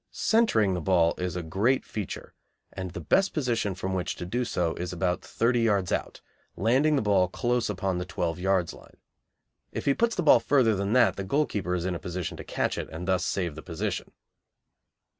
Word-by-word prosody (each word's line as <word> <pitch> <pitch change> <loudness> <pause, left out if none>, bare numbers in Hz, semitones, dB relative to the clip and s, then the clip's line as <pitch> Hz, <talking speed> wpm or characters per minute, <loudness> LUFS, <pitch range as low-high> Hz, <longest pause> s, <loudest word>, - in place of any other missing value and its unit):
Centring 115 - +2
the 90 - -2
ball 85 -1 +3
is 90 -2 -2
a 90 - -3
great 105 +11 +1
feature, 105 -4 -6 0.4
and 95 -1 -5
the 90 - -7
best 195 0 +2
position 120 - 0
from 95 +1 -3
which 90 -1 -2
to 90 - -6
do 120 +8 -1
so 90 -8 -1
is 90 +2 -5
about 90 0 -1
thirty 120 +1 +1
yards 100 -6 +1
out, - - -3 0.3
landing 130 - +3
the 135 - +1
ball 100 -3 +3
close 120 +5 -1
upon 95 -2 -1
the - - -2
twelve 85 -2 -2
yards 95 -2 +1
line. - - -16 0.7
If - - -5
he 140 - +4
puts 230 +8 +1
the 180 - -1
ball 145 - +7
further 120 -2 +3
than 100 +2 -1
that 125 -1 +4
the 100 - -3
goalkeeper 100 -6 0
is 90 -1 -2
in 95 - -1
a 85 - -4
position 90 0 -4
to - - -7
catch - - -2
it - - -5
and 85 +3 -7
thus 95 -1 +2
save 90 -5 -1
the 80 - -9
position. 80 -2 -4
95 Hz, 205 wpm, -27 LUFS, 90-120 Hz, 0.7 s, ball